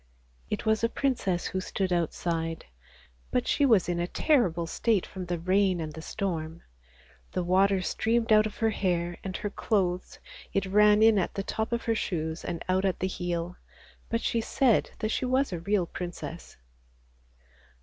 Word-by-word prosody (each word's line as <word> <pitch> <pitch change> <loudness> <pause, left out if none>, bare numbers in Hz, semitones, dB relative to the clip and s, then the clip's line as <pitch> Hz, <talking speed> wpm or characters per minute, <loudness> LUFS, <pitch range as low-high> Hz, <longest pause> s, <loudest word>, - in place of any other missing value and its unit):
It - - -3
was 220 +1 +2
a 230 - +3
princess 230 -10 -1
who 185 - -2
stood 185 0 -1
outside, 165 -1 -2 0.6
but 125 - 0
she 285 - +3
was 220 -7 +4
in 175 -1 -1
a 175 - 0
terrible 180 - +2
state 205 +3 +1
from 185 -2 -7
the 175 0 -1
rain 185 +1 +2
and 155 -2 -4
the 160 - -8
storm. 165 -4 -4 0.7
The 180 - 0
water 190 +2 +3
streamed 225 +3 +1
out 215 0 +5
of 210 - -10
her 225 -1 +2
hair 175 -4 -1
and 190 -1 -4
her 205 - -4
clothes, 185 -5 -1 0.4
it 195 - +1
ran 210 +2 +5
in 220 -2 +6
at 180 - -2
the 195 - -2
top 220 +3 -3
of 235 0 -1
her 230 - +1
shoes 160 -6 -2
and 170 -2 -4
out 185 +1 +2
at 190 -2 0
the - - 0
heel, 175 -1 -3 0.5
but 230 0 0
she 230 - 0
said 245 0 +2
that 215 - -2
she 255 - -1
was 260 -3 +1
a 175 - -3
real 195 +1 +1
princess. 175 -1 -7
190 Hz, 180 wpm, -28 LUFS, 175-215 Hz, 0.7 s, in